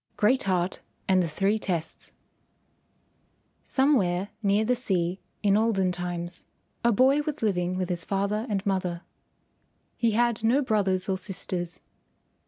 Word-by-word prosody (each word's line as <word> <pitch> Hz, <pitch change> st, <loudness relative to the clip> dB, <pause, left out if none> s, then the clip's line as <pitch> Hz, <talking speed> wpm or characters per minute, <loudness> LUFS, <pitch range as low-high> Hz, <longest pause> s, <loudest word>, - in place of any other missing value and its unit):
GREAT 255 Hz, +6 st, +3 dB
HEART 185 Hz, -1 st, 0 dB, 0.3 s
AND 185 Hz, -1 st, +4 dB
THE 175 Hz, -, 0 dB
THREE 195 Hz, +7 st, +1 dB
TESTS 170 Hz, -6 st, -3 dB, 1.5 s
Somewhere 205 Hz, -9 st, +2 dB
near 205 Hz, +1 st, +2 dB
the 250 Hz, +2 st, +2 dB
sea 185 Hz, -6 st, -1 dB, 0.2 s
in 200 Hz, -1 st, +4 dB
olden 205 Hz, -4 st, +2 dB
times 175 Hz, 0 st, -4 dB, 0.4 s
a 235 Hz, -, +4 dB
boy 265 Hz, +6 st, +4 dB
was 300 Hz, -3 st, -4 dB
living 180 Hz, -3 st, 0 dB
with 185 Hz, -1 st, -2 dB
his 175 Hz, -2 st, -2 dB
father 200 Hz, +4 st, -1 dB
and 200 Hz, -1 st, -1 dB
mother. 180 Hz, -3 st, -1 dB, 0.9 s
He 230 Hz, -2 st, +1 dB
had 235 Hz, -2 st, +1 dB
no 255 Hz, +6 st, +3 dB
brothers 195 Hz, -5 st, +1 dB
or 190 Hz, -1 st, 0 dB
sisters. 180 Hz, -3 st, -5 dB
195 Hz, 135 wpm, -27 LUFS, 180-225 Hz, 1.5 s, AND